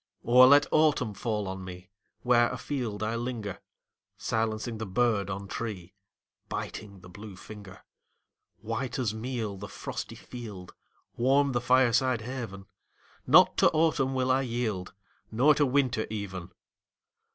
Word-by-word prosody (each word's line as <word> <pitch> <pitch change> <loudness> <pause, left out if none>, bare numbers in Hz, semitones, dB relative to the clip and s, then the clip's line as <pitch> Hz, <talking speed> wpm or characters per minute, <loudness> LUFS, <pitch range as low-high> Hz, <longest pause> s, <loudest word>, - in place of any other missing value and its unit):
Or 125 +2 +7
let 145 +2 +7
autumn 145 -8 +2
fall 105 -2 -2
on 95 0 -5
me 90 +1 -10 0.3
Where 120 -1 +4
afield 120 -4 -4
I 110 +2 -1
linger, 115 -5 -4 0.6
Silencing 110 0 -2
the 110 - -4
bird 105 -1 +1
on 100 +1 -5
tree, 95 -5 -6 0.6
Biting 100 -3 -6
the 90 - -13
blue 100 +2 -10
finger. 100 0 -12 0.8
White 115 +3 -3
as 120 -5 -1
meal 110 -3 -4
the 100 +2 -8
frosty - - -6
field 105 -7 -9 0.4
Warm 135 +3 +3
the 120 -1 0
fireside 125 -1 +3
haven 115 -5 -6 0.6
Not 180 +7 +6
to - - +5
autumn 155 -4 +2
will 130 0 +1
I 130 +1 +3
yield, 115 -7 -3 0.4
Not 135 +7 +4
to 145 - +3
winter 125 -4 +1
even! 95 -4 -5
115 Hz, 135 wpm, -28 LUFS, 100-130 Hz, 0.8 s, Or